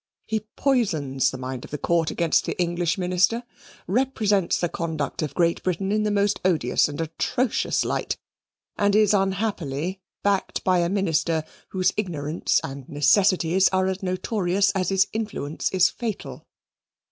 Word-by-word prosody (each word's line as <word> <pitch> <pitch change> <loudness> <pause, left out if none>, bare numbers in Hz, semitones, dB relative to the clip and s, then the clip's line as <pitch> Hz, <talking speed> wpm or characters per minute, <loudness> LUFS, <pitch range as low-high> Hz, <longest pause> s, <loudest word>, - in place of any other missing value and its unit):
He 220 0 -1 0.2
poisons 155 - +1
the 130 - -6
mind 130 -1 -5
of - - -10
the 150 - -4
Court 165 +2 +1
against 170 -2 +1
the - - -3
English 175 0 0
minister, 185 +6 +1 0.4
represents 210 -4 +1
the 175 - +1
conduct 160 -4 -3
of 155 - -3
Great 170 -1 +2
Britain 190 +2 -1
in 215 +1 +2
the 210 - +1
most 205 0 +1
odious 160 -8 +2
and 145 - -7
atrocious 165 +9 0
light, - - -2 0.6
and 205 -1 +3
is 215 -1 +4
unhappily 190 -4 -1 0.2
backed 200 -1 0
by 185 -1 +3
a 170 0 +1
minister 170 -4 +1 0.3
whose 185 -1 +1
ignorance 165 -6 0
and 135 -1 -7
necessities 185 +4 +3
are 185 0 +1
as 190 0 -2
notorious 190 0 0
as 185 -1 -1
his 195 0 +3
influence 210 -9 -3
is 185 -1 +4
fatal." 225 -4 -6
185 Hz, 150 wpm, -24 LUFS, 160-200 Hz, 0.6 s, is